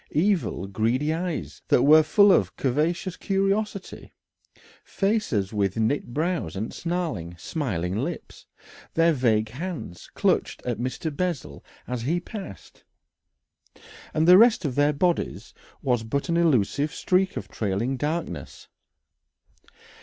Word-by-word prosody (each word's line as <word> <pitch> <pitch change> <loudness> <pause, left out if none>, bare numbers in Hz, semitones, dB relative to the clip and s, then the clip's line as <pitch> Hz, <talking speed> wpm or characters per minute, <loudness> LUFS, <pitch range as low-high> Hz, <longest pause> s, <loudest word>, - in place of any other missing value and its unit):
Evil, 170 - +1
greedy 115 +9 0
eyes 170 0 -4
that 125 - +4
were 155 +3 +8
full 200 +6 +5
of 95 - +4
a - - -24
covetous 160 +7 0
curiosity, 195 0 -2 0.7
faces 195 - -1
with 100 -2 0
knit 115 +3 0
brows 155 - -2
and 105 +4 -4
snarling, 160 - -3
smiling 90 - -3
lips; 145 +10 -5 0.5
their 165 0 +4
vague 110 -5 +1
hands 140 - -7
clutched - - 0
at 120 -3 -2
Mr. 130 +5 -3
Bessel 150 - -3 0.2
as 125 -1 -3
he 160 +9 0
passed, 190 - -10 1.3
and 155 +1 +1
the 180 +2 +9
rest 225 -6 +5
of 140 - -1
their 145 +3 +3
bodies 175 +4 -1 0.3
was 125 -3 +1
but 140 +9 -3
an 170 - +1
elusive 145 -2 +2
streak 185 +2 0
of - - -5
trailing 110 +5 -2
darkness. 145 - -4
145 Hz, 125 wpm, -25 LUFS, 110-175 Hz, 1.3 s, the